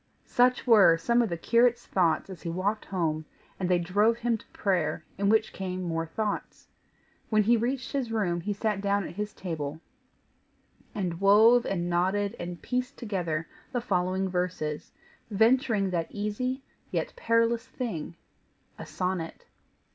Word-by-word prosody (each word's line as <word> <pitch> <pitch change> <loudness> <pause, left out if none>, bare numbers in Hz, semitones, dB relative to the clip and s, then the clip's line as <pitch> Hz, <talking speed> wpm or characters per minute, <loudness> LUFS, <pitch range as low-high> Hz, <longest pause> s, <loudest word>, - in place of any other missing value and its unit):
Such 250 +1 +2
were 205 -9 +7
some 235 +8 +2
of 230 - 0
the 170 - -2
curate's 240 +6 +3
thoughts 170 -4 +1
as 185 - -9
he 170 - -4
walked 195 +5 -1
home, 160 -4 -1 0.3
and 185 -1 -1
they 180 - +4
drove 205 +6 +2
him 235 0 0
to 220 - -10
prayer, 175 -6 -1
in 200 0 +2
which 220 0 +2
came 185 -1 -4
more 165 -1 -2
thoughts. 210 +5 -4 0.6
When 215 -1 +4
he 235 +3 +4
reached 245 +2 -2
his 260 -5 -2
room 180 -6 0
he 205 - -3
sat 205 0 -1
down 200 -1 0
at - - -9
his 210 +3 -4
table, 155 -6 -5 1.2
and 180 -4 -3
wove 220 +5 +6
and 175 -3 -1
knotted 190 +5 +1
and 175 0 -5
pieced 250 +2 -3
together 175 -8 -2 0.3
the 245 - +1
following 190 -3 0
verses, 180 -5 -3 0.4
venturing 220 -2 +3
that 170 -2 -1
easy 250 +6 -3 0.3
yet - - -2
perilous 230 +1 +1
thing, 175 - -5 0.6
a - - -7
sonnet. 180 -3 -3
200 Hz, 155 wpm, -28 LUFS, 175-230 Hz, 1.2 s, were